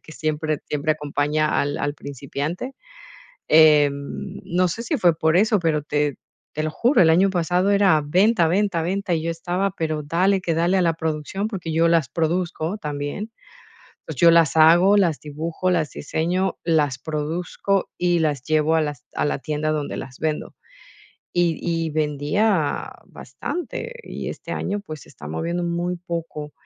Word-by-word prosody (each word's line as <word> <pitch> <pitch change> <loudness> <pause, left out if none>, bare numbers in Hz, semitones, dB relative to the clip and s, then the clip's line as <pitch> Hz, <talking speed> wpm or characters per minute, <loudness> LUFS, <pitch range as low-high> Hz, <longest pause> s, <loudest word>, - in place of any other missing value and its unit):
que 155 - -13
siempre 155 -1 -2
siempre 150 +1 0
acompaña 150 +1 0
al 145 0 -2
al 145 - -2
principiante. 145 - -5 0.7
Em, 150 -3 +3
no 180 +1 +1
sé 225 +7 -4
si 295 +6 -1
fue 175 - +3
por 160 +1 +2
eso, 210 +2 +4
pero 160 -3 +1
te 150 -1 -1 0.4
te 155 - -3
lo 155 - -1
juro, 240 - +2
el 160 - +5
año 185 +4 +4
pasado 180 +2 +1
era 195 -6 +4
venta, 185 +3 +3
venta, 190 +1 +1
venta, 185 +3 -2
y 160 -2 0
yo 165 - -1
estaba, 180 +3 -2
pero, 155 -4 -3
dale 185 +6 +2
que 170 -3 -1
dale 170 +4 +2
a 185 - +3
la 170 -1 +3
producción, 160 +5 -3
porque 180 -7 -5
yo 165 +1 +3
las 165 -6 +2
produzco 170 - -1
también. 150 +8 -5 0.7
Pues, - - -6
yo 170 -1 +6
las 165 -3 +4
hago, 170 +6 +6
las 175 -7 +2
dibujo, 160 +4 -3
las 165 -4 +1
diseño, 175 +6 -1
las 150 -6 +1
produzco, 165 +5 -2
y 175 -1 +2
las 150 -5 0
llevo 155 +2 +2
a 160 - +3
las 145 -5 -4
a - - 0
la 145 - -1
tienda 150 +2 -2
donde 150 -2 -2
las 125 - -8
vendo. 155 -1 -3 0.8
Y 175 -2 +1
y 165 -2 -1
vendía 150 +4 0
bastante 355 - -6
y - - -6
este - - -7
año, 205 +2 -2
pues, 155 -7 -8
se - - -17
está 75 - -12
moviendo 170 - -2
muy 175 +1 -2
poco 165 -4 -6
165 Hz, 170 wpm, -22 LUFS, 150-180 Hz, 0.8 s, yo